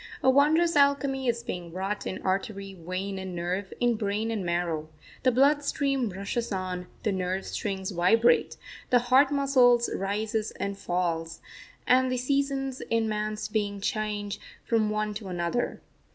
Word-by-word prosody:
A 260 - +6
wondrous 315 +5 +4
alchemy 280 -2 +3
is 235 0 0
being 175 -6 -5
wrought 195 +4 -3
in 185 - -5
artery, 195 +1 -2
vein, 185 +2 -4
and 190 -1 -6
nerve, 180 +3 -3
in 240 -2 +2
brain 215 +1 -1
and 215 -4 -2
marrow. 170 -3 -1 0.3
The 255 - +4
blood 285 +4 +4
stream 275 -4 0
rushes 200 +5 -3
on, 185 -2 -3 0.2
the 215 - +1
nerve 185 0 -2
strings 195 -2 -3
vibrate, 200 +7 +3 0.3
the 250 - +6
heart 255 +3 +4
muscle 265 -4 +5
rises 215 +3 -1
and 200 0 -2
falls, 165 -3 -2 0.5
and 255 0 +4
the 255 - 0
seasons 270 0 -1
in 230 -1 +2
man's 215 0 -2
being 205 -2 -1
change 205 0 -2 0.3
from 220 -2 +2
one 215 0 -1
to 205 -1 -7
another. 175 +6 -2
210 Hz, 150 wpm, -27 LUFS, 190-250 Hz, 0.5 s, A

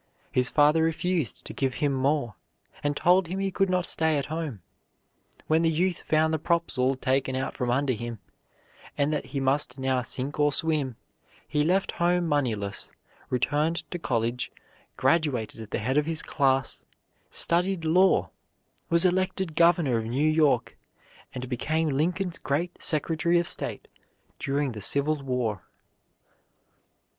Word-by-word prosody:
His 125 0 +1
father 150 +2 +4
refused 165 - -1
to - - -6
give 135 -2 -1
him 145 -2 0
more, 135 -3 0 0.5
and 145 0 0
told 180 0 +4
him 185 +3 -4
he 195 0 -1
could 195 +1 +1
not 180 -1 +1
stay 160 -2 +2
at 140 - -1
home. 150 - -4 0.8
When 160 +1 +2
the 165 - +3
youth 175 +2 0
found 160 +1 +1
the 160 - 0
props 170 0 0
all 130 +1 +2
taken 130 0 0
out 130 +1 -2
from 125 - -2
under 130 +2 +1
him, 120 0 -5 0.8
and 145 +2 +1
that 150 - -2
he 140 +1 -3
must 135 0 +1
now 130 -1 0
sink 130 +4 -3
or 145 0 +4
swim, 145 -4 +1 0.5
he 150 0 +1
left 185 +5 +1
home 175 0 +1
moneyless, 115 -10 -1 0.4
returned 150 +6 0
to 175 - -4
college, 120 -4 -1 0.5
graduated 130 -6 0
at 110 - -9
the - - -2
head 130 +7 +1
of 150 - -2
his 165 -1 -1
class, 135 -2 0 0.5
studied 175 0 0
law, 180 +4 +3 0.6
was 170 +1 +5
elected 185 -2 0
Governor 170 -8 +3
of 110 - -4
New 130 +7 0
York, 155 -5 +2 0.6
and 130 0 -5
became 155 +6 -1
Lincoln's 170 +5 -1
great 150 +6 -2
Secretary 165 +2 +2
of 170 0 +1
State - - -2 0.5
during 140 0 -1
the 110 -3 -7
Civil 140 +6 +1
War. 125 -7 -2
150 Hz, 150 wpm, -26 LUFS, 130-165 Hz, 0.8 s, was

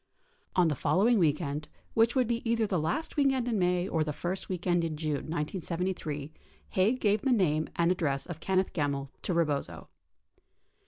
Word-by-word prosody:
54 185 - +4
On - - +4
the 155 - +1
following 195 - +3
weekend, 150 -2 0 0.3
which 230 +2 +3
would 255 -1 +3
be 235 0 -1
either 230 -1 +2
the 190 -4 0
last 165 - -2
weekend 270 -4 +2
in 225 -4 0
May 180 0 +1
or 160 -5 +1
the 150 - -2
first 175 +5 -4
weekend 175 -1 0
in 160 -2 -2
June 155 -1 -1 0.2
1973, 165 -2 -3 0.4
Haig 215 +7 +2
gave 210 -2 +2
the 270 - +1
name 160 -9 +2
and 170 +1 +3
address 145 -7 0
of 175 -3 -7
Kenneth 190 +2 0
Gemmill 140 -3 -1
to - - -2
Rebozo. 150 -4 -1
175 Hz, 175 wpm, -30 LUFS, 155-205 Hz, 0.4 s, 54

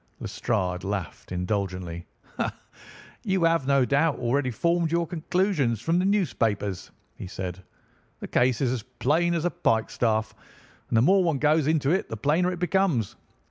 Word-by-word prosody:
Lestrade 90 -1 -2
laughed 95 -4 -5
indulgently. 90 -2 -3 1.2
"You 190 -4 0
have, 165 -5 +2
no 140 -2 +4
doubt, 145 +3 +2
already 130 +2 0
formed 170 +7 0
your 170 0 +1
conclusions 165 - 0
from 165 +9 +1
the 185 - +1
newspapers," 115 - 0 0.3
he - - -7
said. 90 0 -6 0.6
"The - - -6
case 125 0 +2
is 130 -3 +2
as 125 -3 -2
plain 170 +10 0
as 165 0 -1
a 175 - +1
pikestaff, 110 -2 0 0.6
and 115 - +2
the 110 - +5
more 190 +6 +5
one 165 -5 +1
goes 150 +1 +2
into 155 -3 +2
it 190 - 0
the 115 - -5
plainer 155 +9 +1
it 180 - -4
becomes. 175 - +1
140 Hz, 155 wpm, -26 LUFS, 110-170 Hz, 1.2 s, the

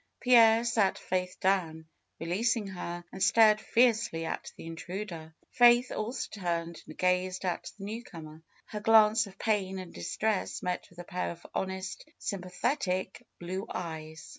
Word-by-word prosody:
Pierre 230 -2 +6
sat 220 -5 +2
Faith 180 0 -3
down, 170 -4 0 0.3
releasing 210 +6 0
her, 175 -2 -6
and 190 - -8
stared 215 0 +5
fiercely 225 -9 +2
at - - -4
the - - -10
intruder. 165 -1 -7 0.2
Faith 240 0 +6
also 220 +4 -3
turned 170 -2 -2
and 155 - -11
gazed 180 +1 0
at 175 -2 -3
the 195 - -9
newcomer. 165 -8 -8 0.2
Her 210 - -6
glance 215 0 +5
of 195 0 -14
pain 195 -3 0
and 185 -2 -8
distress 200 - -2
met 180 0 -3
with 175 - -21
a 175 - -7
pair 180 0 -3
of 170 0 -9
honest, 190 +8 -4
sympathetic 185 +1 -2
blue 185 +4 -5
eyes. 160 -2 -6
190 Hz, 145 wpm, -30 LUFS, 175-215 Hz, 0.3 s, Pierre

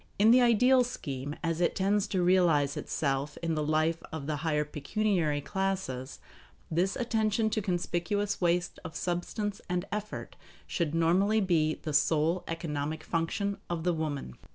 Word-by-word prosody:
In 215 +3 +6
the 250 +1 +7
ideal 250 +2 +5
scheme, 145 - -5
as 165 0 -1
it 175 - +2
tends 200 +1 +1
to 185 -2 0
realize 170 -6 +3
itself 140 0 -2
in 165 -1 0
the 155 - 0
life 155 +2 +1
of 160 -3 -5
the 150 0 -2
higher 150 0 0
pecuniary 155 0 0
classes, 190 -8 -3 0.5
this 180 +4 +1
attention 220 -2 +1
to 215 - 0
conspicuous 195 +2 -1
waste 175 0 +1
of 160 -2 -8
substance 190 +4 -2
and 180 0 -1
effort 210 +1 -5 0.3
should 165 -3 -1
normally 185 +6 +3
be 165 -6 +2
the 155 - -6
sole 155 +4 +2
economic 155 -2 -3
function 200 +5 -1
of 170 -2 -2
the 180 0 +2
woman. 150 - -3
170 Hz, 155 wpm, -30 LUFS, 155-200 Hz, 0.5 s, the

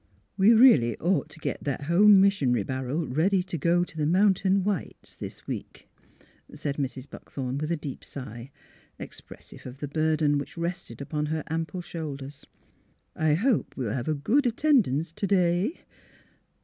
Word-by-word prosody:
'' 105 - -44
We'd 210 +4 +6
really 150 - +6
ought 175 -2 0
t' 155 - -13
get - - -4
that 140 0 -3
home 195 +6 +6
mission 195 -10 +3
'ry 120 -4 +1
barrel 130 - -3
ready 180 +8 +1
to 185 -1 -6
go 170 +3 +2
to 175 - -10
the 150 -1 0
Mountain 190 +1 +3
Whites 200 -5 -4
this - - -9
week," - - -7 0.7
said 145 -1 -4
Mrs. 135 -1 -4
Buckthorn, 135 -1 -6
with 155 +2 -3
a 170 - 0
deep 145 -3 -7
sigh, 120 -2 -9 0.5
ex - - -9
pressive - - -13
of 125 +1 -9
the 145 - -5
burden 155 -1 +1
which 140 - -8
rested 170 - -5
upon 150 +1 -3
her 155 0 -2
ample 165 +2 -3
shoulders. 145 -5 -7 0.4
" - - -41
I 155 -1 +2
hope 225 - 0
we'll 115 -5 -2
have 125 -1 -3
a 155 - +1
good 245 - +2
at 235 - -2
tendance 180 - +2
t' 200 - -2
day." 185 - +1
160 Hz, 175 wpm, -27 LUFS, 140-190 Hz, 0.7 s, We'd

